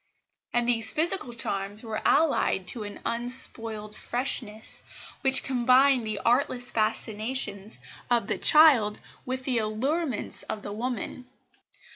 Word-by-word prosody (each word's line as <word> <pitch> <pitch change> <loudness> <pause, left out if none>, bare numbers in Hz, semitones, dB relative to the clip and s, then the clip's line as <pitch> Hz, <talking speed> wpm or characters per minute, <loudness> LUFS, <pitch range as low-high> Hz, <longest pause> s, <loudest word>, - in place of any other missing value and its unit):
And 240 0 +1
these 225 -2 +1
physical 320 -4 -1
charms 205 -2 -2
were 220 -2 -4
allied 285 - +2
to 235 - -3
an 205 -1 -8
unspoiled 230 -3 -2
freshness, 235 -3 -3 0.4
which 265 -1 +4
combined 255 -1 +3
the 215 -1 -2
artless 245 0 +2
fascinations 215 -1 -1 0.3
of 240 -1 +2
the - - -3
child 270 -10 +6 0.3
with 260 +1 -3
the 255 -3 0
allurements 250 +5 -2
of 210 -1 -4
the 205 - -6
woman. 250 +2 -5
240 Hz, 120 wpm, -26 LUFS, 215-260 Hz, 0.4 s, child